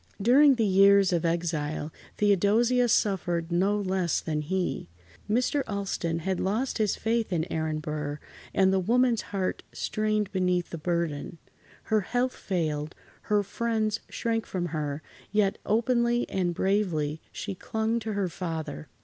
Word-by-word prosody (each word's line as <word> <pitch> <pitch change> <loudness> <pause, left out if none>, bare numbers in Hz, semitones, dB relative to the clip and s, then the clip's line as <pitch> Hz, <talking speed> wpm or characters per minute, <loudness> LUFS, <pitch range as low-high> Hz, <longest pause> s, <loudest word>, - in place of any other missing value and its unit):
During 265 +6 +6
the 230 -2 +1
years 195 -1 +5
of 170 -1 +1
exile, 160 -3 -1 0.2
Theodosia 215 +5 +3
suffered 175 -6 +1
no 195 +4 +2
less 185 -3 0
than 155 -2 -2
he. 175 - -2 0.4
Mr. 250 +6 +2
Alston 195 -5 -2
had 190 -1 0
lost 225 +7 -1
his 210 -3 +2
faith 225 -2 -1
in 165 -3 0
Aaron 160 -1 -1
Burr, 150 -1 -4 0.3
and 190 0 +3
the 190 - +3
woman's 235 +4 +2
heart 190 -2 -3
strained 215 -1 -1
beneath 180 -2 0
the 165 - -5
burden. 170 -2 -2 0.5
Her 215 -1 +1
health 245 +5 0
failed, 155 -4 -2 0.3
her 210 -1 +3
friends 220 +1 -1
shrank 225 -1 -2
from 180 -2 -2
her, 150 -1 -3 0.3
yet 205 -2 +1
openly 235 +2 +2
and 175 -2 0
bravely 165 -7 0
she 200 - -5
clung 220 +4 -1
to 220 -1 -4
her 200 -2 0
father. 160 - -5
190 Hz, 140 wpm, -27 LUFS, 170-220 Hz, 0.5 s, During